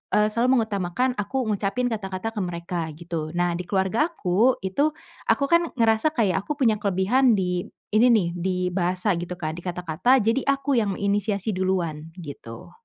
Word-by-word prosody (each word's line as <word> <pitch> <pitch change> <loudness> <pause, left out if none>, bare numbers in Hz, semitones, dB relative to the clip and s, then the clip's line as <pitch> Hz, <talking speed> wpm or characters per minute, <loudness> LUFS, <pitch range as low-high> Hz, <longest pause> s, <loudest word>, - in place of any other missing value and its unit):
eee, 210 0 +3
selalu 245 +3 +3
mengutamakan 200 +4 -1
aku 255 +6 -1
ngucapin 210 +5 -1
kata-kata 200 0 -3
ke 215 - -5
mereka 170 -2 -3
gitu. 165 -1 -5
Nah, 175 0 +1
di 180 - -6
keluargaku 215 - +1
itu 285 +11 0 0.3
aku - - +3
kan 340 0 +4
ngerasa 230 +6 +2
kayak 200 -6 +2
aku 300 - -1
punya 220 -3 +3
kelebihan 210 +5 +3
di 180 -2 -1 0.2
ini 220 +4 +5
nih, 210 -7 +3
di 185 +1 -1 0.2
bahasa 180 +2 0
gitu 175 +1 -5
Kak, 155 -3 -3
di - - -7
kata-kata, 180 +8 +1
jadi 230 +5 +1
aku 275 0 +1
yang 200 -4 -1
inisiasi 205 +1 -1
duluan 175 -5 -1
gitu. 135 -8 -9
200 Hz, 165 wpm, -24 LUFS, 180-235 Hz, 0.3 s, ini